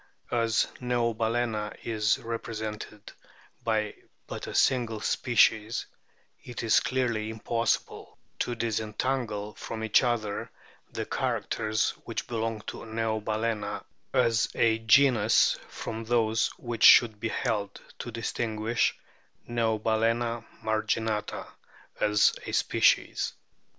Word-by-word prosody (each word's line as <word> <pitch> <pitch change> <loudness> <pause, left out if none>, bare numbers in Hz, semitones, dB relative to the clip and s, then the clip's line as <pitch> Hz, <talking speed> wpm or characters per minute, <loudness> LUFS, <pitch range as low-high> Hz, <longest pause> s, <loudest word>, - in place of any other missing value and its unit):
As 115 -1 +2 0.2
Neobalana 115 -2 0
is 110 -2 +1
repre 115 0 -5
sented 105 -1 -6 0.5
by 110 -2 0 0.3
but - - -6
a - - -6
single 120 -4 +2
species 110 -1 +2 0.6
it 120 -2 -6
is 115 - +5
clearly 120 -4 -1
impossible 115 +1 -2 0.2
to 120 - -1
disentangle 110 -1 -2
from 110 -1 -6
each 110 -1 +4
other 115 -5 -1 0.4
the - - -4
characters 110 0 -1
which - - -4
belong 115 -2 -2
to - - -7
Neobalcena 110 -1 -2 0.3
as 115 -4 +2
a 115 -1 +3
genus 115 -1 +5
from 110 0 -5
those 115 -1 +2
which 120 -2 -5
should 110 -3 +8
be 115 - -2
held 105 -5 -2 0.2
to - - -5
distinguish 115 0 -1 0.5
Neobalcena 115 0 0 0.2
marginata 110 -1 -1 0.5
as 105 -1 +4
a - - -3
species. - - +2
115 Hz, 105 wpm, -28 LUFS, 110-120 Hz, 0.6 s, should